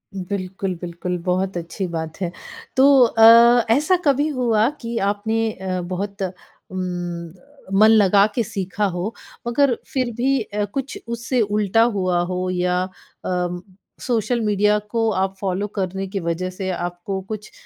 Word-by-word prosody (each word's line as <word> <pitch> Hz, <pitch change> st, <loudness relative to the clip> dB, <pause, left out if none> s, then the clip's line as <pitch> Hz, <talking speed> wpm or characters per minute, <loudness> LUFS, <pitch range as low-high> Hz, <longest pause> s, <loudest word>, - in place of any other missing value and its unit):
बिल्कुल, 190 Hz, 0 st, -3 dB
बिल्कुल, 175 Hz, +1 st, -4 dB
बहुत 185 Hz, 0 st, 0 dB
अच्छी 170 Hz, +3 st, -4 dB
बात 160 Hz, -2 st, -5 dB
है। 175 Hz, -1 st, -1 dB, 0.5 s
तो 265 Hz, -, +6 dB, 0.2 s
अ, 230 Hz, +1 st, +7 dB
ऐसा 305 Hz, +8 st, +3 dB
कभी 285 Hz, +1 st, +3 dB
हुआ 240 Hz, -6 st, +2 dB
कि 230 Hz, 0 st, -4 dB
आपने 220 Hz, +2 st, -1 dB
अ, 185 Hz, -2 st, -4 dB
बहुत 195 Hz, +3 st, -5 dB
उम, 185 Hz, 0 st, -7 dB, 1.0 s
मन 215 Hz, -, +7 dB
लगा 200 Hz, -2 st, +5 dB
के 235 Hz, -, +1 dB
सीखा 195 Hz, +1 st, -2 dB
हो 185 Hz, +4 st, -2 dB, 0.3 s
मगर 250 Hz, +1 st, +3 dB, 0.2 s
फिर 255 Hz, -3 st, 0 dB
भी 265 Hz, +2 st, +1 dB
अ, 210 Hz, -1 st, -2 dB
कुछ 270 Hz, +6 st, -5 dB
उससे 235 Hz, +2 st, -1 dB
उल्टा 210 Hz, +1 st, +2 dB
हुआ 185 Hz, -2 st, +1 dB
हो 185 Hz, 0 st, -2 dB
या 180 Hz, 0 st, 0 dB
अ, 180 Hz, -1 st, -5 dB, 0.4 s
सोशल 235 Hz, -1 st, 0 dB
मीडिया 210 Hz, 0 st, +2 dB
को 225 Hz, 0 st, +1 dB
आप 190 Hz, 0 st, -1 dB
फ़ॉलो 195 Hz, +1 st, -1 dB
करने 190 Hz, +1 st, -2 dB
की 195 Hz, +1 st, -3 dB
वजह 170 Hz, +2 st, -2 dB
से 190 Hz, +1 st, -5 dB
आपको 175 Hz, +2 st, -4 dB
कुछ 210 Hz, +2 st, -7 dB
200 Hz, 145 wpm, -21 LUFS, 185-225 Hz, 1.0 s, अ